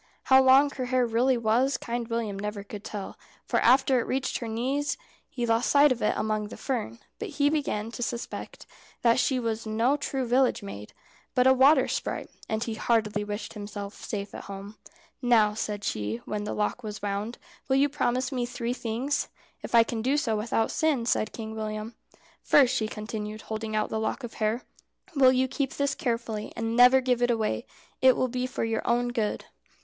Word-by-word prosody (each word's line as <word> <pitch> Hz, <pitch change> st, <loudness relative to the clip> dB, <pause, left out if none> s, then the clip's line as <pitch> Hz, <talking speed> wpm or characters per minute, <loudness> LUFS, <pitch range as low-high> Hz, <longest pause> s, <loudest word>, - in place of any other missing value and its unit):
How 265 Hz, 0 st, +6 dB
long 265 Hz, +2 st, +6 dB
her 255 Hz, -2 st, -4 dB
hair 250 Hz, 0 st, +2 dB
really 240 Hz, +3 st, +2 dB
was 240 Hz, +4 st, +2 dB
Kind 235 Hz, -1 st, -4 dB
William 225 Hz, -4 st, -2 dB
never 210 Hz, 0 st, -4 dB
could 205 Hz, 0 st, -9 dB
tell, 205 Hz, -3 st, -7 dB, 0.3 s
for -, -, +1 dB
after 260 Hz, +1 st, +4 dB
it -, -, -3 dB
reached 265 Hz, 0 st, -1 dB
her 235 Hz, -, -5 dB
knees 260 Hz, +6 st, -1 dB, 0.3 s
he 245 Hz, -, -3 dB
lost 230 Hz, +1 st, +1 dB
sight 285 Hz, 0 st, +6 dB
of 245 Hz, -, -1 dB
it -, -, +1 dB
among 215 Hz, -1 st, -1 dB
the -, -, -9 dB
fern; 230 Hz, -, -3 dB, 0.2 s
but 440 Hz, -, -4 dB
he 290 Hz, 0 st, +3 dB
began 230 Hz, -8 st, -1 dB
to 235 Hz, -, -7 dB
suspect 235 Hz, 0 st, -5 dB, 0.4 s
that 235 Hz, +1 st, +4 dB
she 260 Hz, 0 st, +2 dB
was 225 Hz, -2 st, -3 dB
no 230 Hz, +6 st, +2 dB
true 270 Hz, -2 st, -2 dB
village 250 Hz, -2 st, +2 dB
maid, 105 Hz, -, -8 dB, 0.4 s
but 250 Hz, -, +4 dB
a 260 Hz, -, +7 dB
water 265 Hz, +2 st, +5 dB
sprite, -, -, -3 dB, 0.2 s
and 220 Hz, +1 st, -1 dB
he 230 Hz, -, -3 dB
heartily 215 Hz, -2 st, 0 dB
wished 205 Hz, +1 st, -5 dB
himself 205 Hz, -1 st, -6 dB
safe 200 Hz, -1 st, -6 dB
at -, -, -8 dB
home. 200 Hz, +1 st, -8 dB, 0.5 s
"Now," 225 Hz, -4 st, +4 dB
said 210 Hz, -1 st, -4 dB
she, 105 Hz, -, -2 dB
when 210 Hz, 0 st, -3 dB
the -, -, -3 dB
lock 210 Hz, +3 st, -1 dB
was 210 Hz, -2 st, -7 dB
wound, 205 Hz, +3 st, -3 dB, 0.3 s
"will 265 Hz, -, +2 dB
you 275 Hz, +2 st, +4 dB
promise 260 Hz, -2 st, -1 dB
me 245 Hz, -2 st, -1 dB
three 240 Hz, 0 st, -3 dB
things?" 250 Hz, +4 st, -2 dB, 0.3 s
"If -, -, -3 dB
I 230 Hz, -, +8 dB
can 225 Hz, 0 st, -4 dB
do 265 Hz, +5 st, +1 dB
so 235 Hz, -7 st, 0 dB
without 225 Hz, +1 st, 0 dB
sin," 300 Hz, -7 st, +1 dB
said 215 Hz, -, +1 dB
Kind 220 Hz, -1 st, -7 dB
William. 215 Hz, +1 st, -4 dB, 0.5 s
"First," 270 Hz, -4 st, +5 dB
she 215 Hz, -, 0 dB
continued, 215 Hz, 0 st, -6 dB
holding 220 Hz, 0 st, -4 dB
out 215 Hz, -, 0 dB
the 220 Hz, -, -2 dB
lock 220 Hz, +4 st, -2 dB
of 240 Hz, -, -6 dB
hair, 220 Hz, +3 st, -1 dB, 0.5 s
"will 265 Hz, -2 st, +6 dB
you 260 Hz, 0 st, +2 dB
keep 270 Hz, 0 st, -2 dB
this 280 Hz, 0 st, 0 dB
carefully, 230 Hz, -3 st, -3 dB
and 225 Hz, 0 st, -2 dB
never 250 Hz, +2 st, +7 dB
give 250 Hz, -1 st, +1 dB
it 245 Hz, -, +3 dB
away? 215 Hz, -, -1 dB, 0.3 s
It 260 Hz, -1 st, +6 dB
will 255 Hz, -, +1 dB
be 250 Hz, +1 st, -2 dB
for 255 Hz, -, -3 dB
your 225 Hz, 0 st, 0 dB
own 240 Hz, +1 st, +1 dB
good." 225 Hz, -4 st, -2 dB
235 Hz, 200 wpm, -27 LUFS, 215-255 Hz, 0.5 s, I